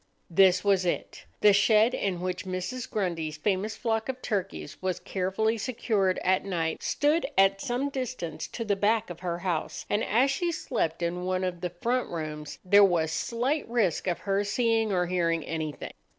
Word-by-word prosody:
This 180 Hz, +1 st, +5 dB
was 195 Hz, -2 st, +3 dB
it: 175 Hz, -, -3 dB, 0.2 s
the 210 Hz, -1 st, +7 dB
shed 215 Hz, +4 st, +4 dB
in 185 Hz, -3 st, -1 dB
which 185 Hz, 0 st, -3 dB
Mrs. 190 Hz, +7 st, -4 dB
Grundy's 165 Hz, -6 st, -2 dB
famous 205 Hz, +5 st, -1 dB
flock 225 Hz, 0 st, -1 dB
of 260 Hz, -1 st, -3 dB
turkeys 195 Hz, -3 st, -3 dB
was 185 Hz, -1 st, -1 dB
carefully 205 Hz, +4 st, -1 dB
secured 215 Hz, -5 st, 0 dB
at 185 Hz, +1 st, +2 dB
night 165 Hz, -4 st, -2 dB
stood 300 Hz, +3 st, +1 dB
at 195 Hz, 0 st, +4 dB
some 255 Hz, +3 st, -1 dB
distance 250 Hz, -, -4 dB
to 230 Hz, -, -5 dB
the 205 Hz, -2 st, +1 dB
back 215 Hz, 0 st, +1 dB
of 170 Hz, -, -9 dB
her 175 Hz, -2 st, -3 dB
house, 175 Hz, -3 st, -3 dB
and 210 Hz, +2 st, +2 dB
as 255 Hz, +6 st, +3 dB
she 345 Hz, +4 st, 0 dB
slept 175 Hz, -, -2 dB
in 175 Hz, +1 st, -2 dB
one 185 Hz, 0 st, -1 dB
of 180 Hz, -2 st, -3 dB
the 180 Hz, -, -1 dB
front 240 Hz, +9 st, -1 dB
rooms, 155 Hz, -2 st, -5 dB
there 200 Hz, +2 st, +7 dB
was 170 Hz, -5 st, +3 dB
slight 245 Hz, -, -1 dB
risk 215 Hz, -8 st, +1 dB
of 175 Hz, -2 st, +1 dB
her 200 Hz, 0 st, 0 dB
seeing 225 Hz, 0 st, +1 dB
or 180 Hz, -2 st, +2 dB
hearing 170 Hz, -2 st, 0 dB
anything. 160 Hz, -2 st, -4 dB
195 Hz, 180 wpm, -28 LUFS, 175-225 Hz, 0.2 s, the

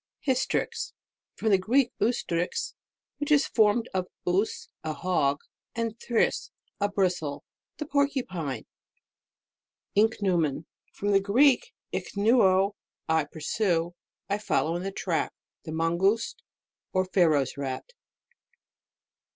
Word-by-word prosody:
HYSTRIX. 265 Hz, -, 0 dB, 0.4 s
From 220 Hz, -, 0 dB
the 195 Hz, -2 st, +5 dB
Greek, 245 Hz, +6 st, +2 dB
ustrix. 180 Hz, -7 st, 0 dB, 0.5 s
which 290 Hz, +1 st, -2 dB
is 295 Hz, -1 st, +5 dB
formed 220 Hz, +1 st, +3 dB
of 185 Hz, -1 st, -1 dB, 0.2 s
us, 190 Hz, +5 st, 0 dB, 0.2 s
a 155 Hz, -1 st, -2 dB
hog, 145 Hz, -5 st, +1 dB, 0.3 s
and 230 Hz, -1 st, -2 dB
thrix, 235 Hz, -2 st, +1 dB, 0.3 s
a 205 Hz, 0 st, +1 dB
bristle. 180 Hz, -7 st, -1 dB, 0.3 s
The 300 Hz, -, -4 dB
Porcupine. 245 Hz, -, -1 dB, 1.3 s
INCHNEUMON. 185 Hz, -8 st, +2 dB, 0.3 s
From 205 Hz, +1 st, -2 dB
the 195 Hz, -, +6 dB
Greek, 265 Hz, -, +3 dB, 0.2 s
ich -, -, -4 dB
neud, 200 Hz, -3 st, +4 dB, 0.4 s
I 160 Hz, -2 st, +2 dB
pursue, 170 Hz, +3 st, -1 dB, 0.3 s
I 200 Hz, +1 st, 0 dB
follow 170 Hz, -5 st, +1 dB
in 175 Hz, -, -2 dB
the 195 Hz, +1 st, -3 dB
track. 180 Hz, -3 st, -1 dB, 0.3 s
The 160 Hz, -, -5 dB
Mangouste, 170 Hz, +7 st, +1 dB, 0.5 s
or 185 Hz, 0 st, +2 dB
Pharaoh's 160 Hz, -7 st, +3 dB
nt. 140 Hz, -, -5 dB
195 Hz, 110 wpm, -27 LUFS, 165-225 Hz, 1.3 s, the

